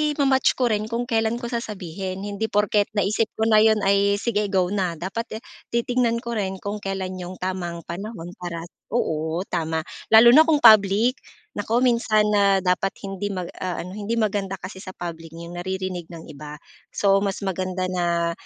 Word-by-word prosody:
ima-match 270 -2 +3
ko 245 -3 +1
rin 215 0 -1
kung 230 +2 -2
kailan 225 -2 0
ko 240 0 -5
sasabihin. 190 -4 -5
Hindi 205 +2 -3
porket 205 -1 +2
naisip 210 +2 +1
ko 220 - -1
na 220 -1 +5
'yon, 215 -1 +4
ay, 200 +1 +3
sige 210 0 -1
go 190 -2 +1
na. 185 -4 -1
Dapat 220 +7 -5 0.2
titingnan 235 0 0
ko 235 - -4
rin 195 -4 -2
kung 205 +1 -3
kailan 190 -2 -4
yung 180 +1 -7
tamang 180 -2 -4
panahon 175 0 -7
para 170 -2 -5 0.2
oo, 160 -6 -1
tama. 160 -2 -1 0.2
Lalo 225 +2 +8
na 310 +5 +7
kung 305 -3 +2
public. 215 +3 +6 0.4
Naku, 230 +4 +1
minsan 230 -3 +3
na 200 -2 +3
dapat 185 +1 0
hindi 195 0 -4
mag-aano, 185 -2 -5
hindi 210 +3 -3
maganda 205 -3 -1
kasi 185 +1 -9
sa 185 -1 -9
public, 165 -2 -7
yung 170 +1 -8
naririnig 185 -1 -4
ng 170 -2 -10
iba. 150 +1 -9 0.4
So, 195 -1 +3
mas 200 0 -2
maganda 185 -1 -2
na 170 -2 0
195 Hz, 170 wpm, -23 LUFS, 180-220 Hz, 0.4 s, Lalo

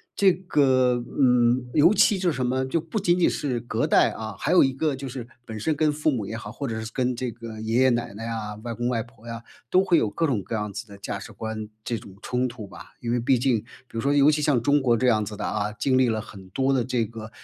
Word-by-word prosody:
这 195 -2 +5
个， 130 -9 +2 0.2
嗯， 125 -1 +4
尤 160 +4 +6
其 205 - +5
就 180 -2 +2
是 150 - -1
什 130 -1 -1
么， 130 +1 0
就 160 +5 0
不 165 +7 -3
仅 180 -2 +2
仅 - - +5
是 130 -5 -2
隔 115 0 -1
代， - - +4
啊， 110 -2 -6
还 150 - -1
有 180 - +7
一 135 - +2
个 140 +1 -1
就 135 0 -6
是 120 -2 -7 0.2
本 110 -2 -6
身 155 +8 0
跟 155 0 +2
父 150 +1 0
母 115 -6 -2
也 110 +1 -5
好， 105 -2 -8
或 140 +4 -5
者 110 -1 -3
是 110 - -5
跟 125 -1 0
这 125 0 -3
个 115 -1 -9
爷 115 +3 +1
爷 130 - +6
奶 120 -4 -1
奶 110 +3 -7
啊、 110 -2 -4
外 120 -1 -4
公 120 +2 -2
外 120 -2 0
婆 115 -1 -18
呀， 115 0 -6 0.3
都 185 +1 +5
会 180 -3 +3
有 110 - +2
各 165 +10 -1
种 120 -8 0
各 100 - -4
样 105 -1 -3
子 105 +4 -7
的 100 -1 -12
价 100 0 -4
值 100 - -9
观 110 -1 -5 0.2
这 120 - -2
种 95 -3 -12
冲 125 +1 0
突 120 -4 -8
吧。 90 -2 -13
因 120 - -2
为 120 - +1
毕 125 +2 +3
竟 125 -2 +2
比 115 - -23 0.3
如 115 - -2
说 140 +4 +1
尤 145 0 +6
其 150 - 0
像 140 -5 +3
中 145 +5 +3
国 125 -4 +3
这 125 +2 +1
样 110 -3 +3
子 105 +1 -6
的 105 - -5
啊， 105 0 -2
经 130 +5 +1
历 130 -1 +4
了 110 -2 0
很 100 -3 -12
多 135 +6 +1
的 130 -3 +1
这 125 -3 0
个， 110 0 -9
120 Hz, 305 characters per minute, -25 LUFS, 110-135 Hz, 0.3 s, 有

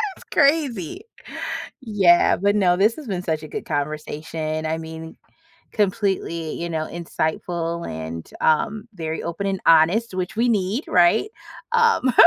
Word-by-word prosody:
It's - - -15
crazy. 280 - +2 0.8
Yeah. 200 -8 +4
But 200 +2 +2
no, 185 -4 +4
this 210 +5 +3
has 310 - -9
been 190 -4 -2
such 160 -3 -2
a - - -7
good - - -6
conversation. 155 +1 -3
I 160 +1 -1
mean, 160 0 -8 0.6
completely, 190 -6 -1
you 170 0 -4
know, 160 -1 -2
insightful 170 +1 -3
and, 80 +1 -6
um, 215 +8 +1
very 160 -3 -4
open 170 +4 -3
and 195 -1 -1
honest, 170 +8 +4
which 185 +1 -3
we 235 +3 +2
need. 215 - 0
Right? 180 - +4 0.4
Um 460 - +3
175 Hz, 140 wpm, -22 LUFS, 160-215 Hz, 0.8 s, Yeah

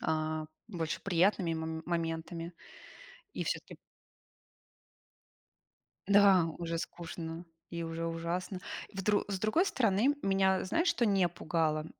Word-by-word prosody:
а, 155 0 -1 0.2
больше 165 -6 -3
приятными 180 -1 +2
мом 160 0 -3
моментами. 165 0 -3 0.8
И - - -2
всё-таки - - -3 2.3
Да, 200 -3 +6
уже 170 -1 -2
скучно 165 0 -6 0.3
и 170 -1 -3
уже 165 0 -3
ужасно. 170 +3 -3 0.3
Вдр 200 +1 +1
с 195 -2 -2
другой 215 - +3
стороны, 235 - +3
меня 195 -1 +3
знаешь, 330 - +1
что 240 -7 +2
не 195 -4 +3
пугало? 160 -2 0
175 Hz, 110 wpm, -32 LUFS, 165-195 Hz, 2.3 s, Да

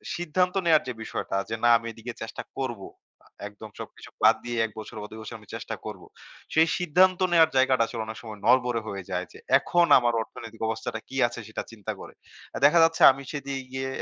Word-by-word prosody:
সিদ্ধান্ত 180 +2 0
নেওয়ার 160 -2 +5
যে 125 - -3
বিষয়টা 95 - -3
যে 115 - -2
না 120 - +5
আমি 115 - -8
এদিকে 115 +2 -8
চেষ্টা 110 - -6 0.2
করব। 120 -6 -3 0.4
আ - - -21 0.2
একদম 105 +1 -11
সবকিছু - - -10
বাদ - - +7
দিয়ে 120 0 -3
১ 110 - -7
বছর 110 +2 -9
বা - - -6
২ 110 - -9
বছর 110 +1 -8
আমি 105 - -19
চেষ্টা 115 0 -5
করব। 105 -4 -7 0.5
সেই 160 +1 +5
সিদ্ধান্ত 180 +2 +3
নেওয়ার 165 -2 +5
জায়গাটা 130 -2 +4
আসলে 115 -2 -4
অনেক 110 0 -7
সময় 110 -2 -9
নড়বড়ে 125 -1 +3
হয়ে 100 -2 -5
যায় 90 0 -2
যে - - -13 0.2
এখন 175 -1 +2
আমার 120 -1 +1
অর্থনৈতিক 115 0 -10
অবস্থাটা 110 0 -3
কি 135 - -6
আছে 120 0 -8
সেটা 110 - -5
চিন্তা 105 -4 -6
করে। - - -11 0.5
দেখা 150 +4 +6
যাচ্ছে 165 0 +2
আমি 135 +1 -8
সেদি 140 -2 -5 0.2
ইয়ে 130 0 -3
120 Hz, 205 wpm, -26 LUFS, 110-150 Hz, 0.5 s, বাদ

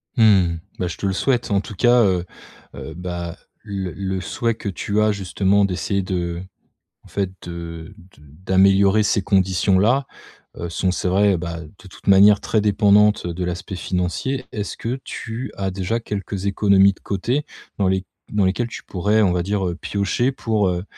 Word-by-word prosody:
Mmh, 100 -7 +4 0.2
bah, 90 - 0
je 85 - -6
te - - -4
le 95 - +1
souhaite 120 +3 0
en 100 0 +2
tout 105 - -9
cas, 120 +3 +5
heu 90 -3 +1 0.5
heu, 70 +3 -7
bah, 85 -1 -5 0.3
le 100 -4 -4
le 95 0 -3
souhait 115 +2 -1
que 105 - -5
tu 100 +2 -1
as 110 0 +3
justement 100 +1 +1
d'essayer 100 +1 -1
de, 85 -2 -3 0.6
en - - -16
fait, 100 -2 -2
de 85 -1 -8 0.2
de 75 - -20 0.2
d'améliorer 95 +2 +4
ces 100 - +1
conditions-là, 95 +7 +2 0.5
heu, 85 - -5
sont 95 +2 0
c'est 90 0 -1
vrai, 100 +1 +3
bah, 85 -1 -5
de 95 +5 -14
toute 90 - -17
manière 100 +1 +7
très 110 - +1
dépendante 105 -1 +4
de 90 +1 -3
l'aspect 90 +2 -4
financier. 90 +10 -2
Est-ce 105 -1 -4
que 125 +4 -3
tu 120 +3 -6
as 95 -1 -2
déjà 95 +5 -2
quelques 100 -2 -4
économies 100 -1 +4
de - - -25
côté 125 +9 -1 0.3
dans 100 - +2
les 95 0 0 0.3
dans 105 -2 +2
lesquelles 115 +6 0
tu - - -8
pourrais, 105 +4 +1
on 100 -4 +3
va 90 -1 0
dire, 100 0 -1
heu, 85 - -3
piocher 100 +7 -1
pour, 110 -6 0
heu, 90 0 -3
95 Hz, 180 wpm, -21 LUFS, 90-105 Hz, 0.6 s, manière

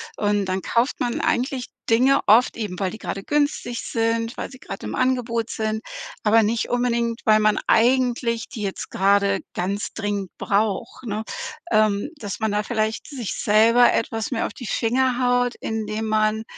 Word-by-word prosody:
und 205 -1 +1
dann 185 0 -2
kauft 235 +7 0
man 240 -1 -1
eigentlich 255 0 0 0.2
Dinge 255 +4 +4
oft 230 +4 +5
eben, 205 -5 -5
weil 190 -2 -1
die 220 - -8
gerade 195 0 -5
günstig 290 -5 -1
sind, 230 +1 -1
weil - - -4
sie 255 - -13
gerade - - -8
im - - -4
Angebot 240 -3 0
sind, 220 0 -2 0.4
aber 225 +1 +5
nicht 220 +2 0
unbedingt, 235 -1 0
weil 215 -1 +5
man 215 0 +3
eigentlich 240 0 +2
die 220 - -8
jetzt 195 -2 -4
gerade 200 0 +2
ganz 200 +3 -2
dringend 205 -3 -3
braucht, 215 +5 -1
ne, 215 0 -3 0.5
ähm. 215 +3 +2
Dass 205 -7 -6
man 220 -1 0
da 210 0 +1
vielleicht 220 -1 -2
sich 250 -8 -4
selber 230 +3 +5
etwas 225 +1 -2
mehr 230 - 0
auf - - -5
die 245 - -8
Finger 250 +4 +1
haut, 245 -1 +2
indem 220 0 -3
man, 215 0 +1
225 Hz, 170 wpm, -23 LUFS, 210-245 Hz, 0.5 s, oft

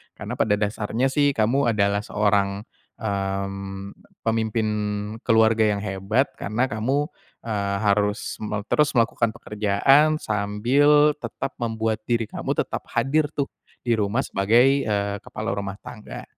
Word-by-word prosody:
Karena - - -6
pada 105 -2 +3
dasarnya 110 +5 -1
sih, 145 -1 +2
kamu 120 +5 +2
adalah 100 0 +2
seorang, 100 -1 0 0.3
mmm, 100 -1 -4 0.2
pemimpin 110 0 0 0.6
keluarga 110 -1 +4
yang 100 - -5
hebat, 100 +6 0
karena 120 +6 -1
kamu, 130 +7 0 0.4
eee, 100 -3 -1
harus 105 +2 0
mel 105 -1 -3
terus 150 -1 +3
melakukan 115 -1 +2
pekerjaan, 120 +10 +3
sambil 125 +9 +3
tetap 115 +3 -5
membuat 110 -2 -1
diri 115 -2 +1
kamu - - -2
tetap - - -3
hadir 140 +6 +2
tuh, 140 -1 0 0.4
di 120 - -1
rumah 105 +6 0
sebagai, 120 +7 +3
eee, 100 -1 0
kepala - - -5
rumah 100 -1 -4
tangga. 105 - -9
110 Hz, 130 wpm, -24 LUFS, 100-125 Hz, 0.6 s, keluarga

